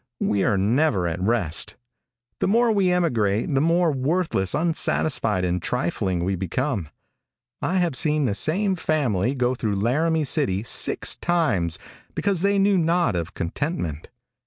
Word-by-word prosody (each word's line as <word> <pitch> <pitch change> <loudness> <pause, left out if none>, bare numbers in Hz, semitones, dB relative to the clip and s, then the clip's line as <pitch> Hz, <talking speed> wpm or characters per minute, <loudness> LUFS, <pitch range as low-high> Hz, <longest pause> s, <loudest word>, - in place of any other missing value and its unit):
We 100 -2 0
are 105 -4 +2
never 105 - +1
at 85 +2 -3
rest. 95 -6 0 0.6
The - - 0
more 230 +3 +3
we 195 -4 +2
emigrate 120 - 0
the 135 - +2
more 165 +1 +2
worthless, 140 - 0
unsatisfied 140 - 0
and 90 0 -1
trifling 100 - -1
we 95 +2 0
become. 95 - -2 0.7
I 180 - -1
have 175 -6 +1
seen 150 +1 +1
the 105 - 0
same 190 - +1
family 135 - 0
go 125 -1 +1
through 110 -5 -2
Laramie 155 +10 +1
City 95 -6 0
six - - +1
times 105 - 0 0.4
because 195 -4 0
they 200 +1 +2
knew 195 -1 +3
not 165 - +1
of 85 +1 -4
contentment. 85 - -4
130 Hz, 145 wpm, -23 LUFS, -, 0.7 s, more